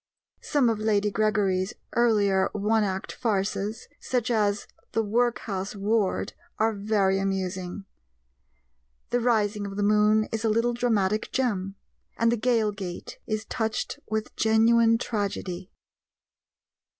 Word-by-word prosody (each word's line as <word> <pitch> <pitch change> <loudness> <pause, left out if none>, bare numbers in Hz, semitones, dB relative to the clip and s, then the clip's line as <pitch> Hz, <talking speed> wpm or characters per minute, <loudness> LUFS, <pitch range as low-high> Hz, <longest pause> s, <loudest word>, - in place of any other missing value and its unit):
Some 285 -4 +2
of 225 -2 +1
Lady 210 -1 +1
Gregory's 200 -3 +1 0.2
earlier 205 -5 +3
one 215 +1 +2
act 190 -1 -3
farces, 210 0 -2
such 250 -1 -1
as 205 -2 +1 0.3
The 225 - +1
Workhouse 210 -3 -1
Ward, 205 0 0 0.2
are 225 +1 +2
very 200 -2 +1
amusing; 190 -1 -3 1.3
The 245 - +2
Rising 210 -4 +1
of 195 - -7
the 205 - 0
Moon 210 +1 +4
is 225 0 -2
a 225 - +2
little 230 +2 +2
dramatic 215 -4 0
gem, 200 -7 -1 0.4
and 230 0 +3
The 235 - +1
Gaol 225 -2 +2
Gate 190 -4 -7
is 215 -1 -2
touched 220 -3 -2
with 220 0 -3
genuine 225 +1 +4
tragedy. 195 -5 -3
215 Hz, 125 wpm, -26 LUFS, 195-225 Hz, 1.3 s, Moon